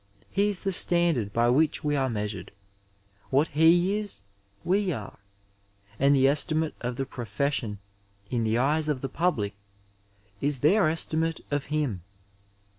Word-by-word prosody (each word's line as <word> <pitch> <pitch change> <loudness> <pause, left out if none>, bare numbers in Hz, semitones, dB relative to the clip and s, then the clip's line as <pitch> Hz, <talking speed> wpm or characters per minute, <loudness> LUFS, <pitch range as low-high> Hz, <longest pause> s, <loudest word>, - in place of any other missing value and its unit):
He 200 +1 +2
is 200 -3 -2
the 195 - -1
standard 170 - +2
by 120 +3 +2
which 150 +4 +2
we 150 -1 0
are 135 -2 +1
mea 105 -3 -2
sured. 100 -3 -6 0.8
What 145 +4 +2
he 175 +6 +4
is, 205 - -6 0.4
we 195 +1 +1
are; 110 -9 -7 0.8
and 140 +1 +4
the 135 0 +4
estimate 155 +2 +1
of 125 0 -3
the 135 - -2
pro 125 -2 -7
fession 115 -1 -2 0.5
in 115 +2 -1
the 110 +1 +1
eyes 150 +5 +1
of 145 -4 -1
the 135 - -3
public 140 - -1 0.9
is 140 -3 -1
their 175 +3 +4
estimate 160 0 -1
of 145 -1 -1
him. 145 -10 -1
145 Hz, 155 wpm, -27 LUFS, 125-165 Hz, 0.9 s, he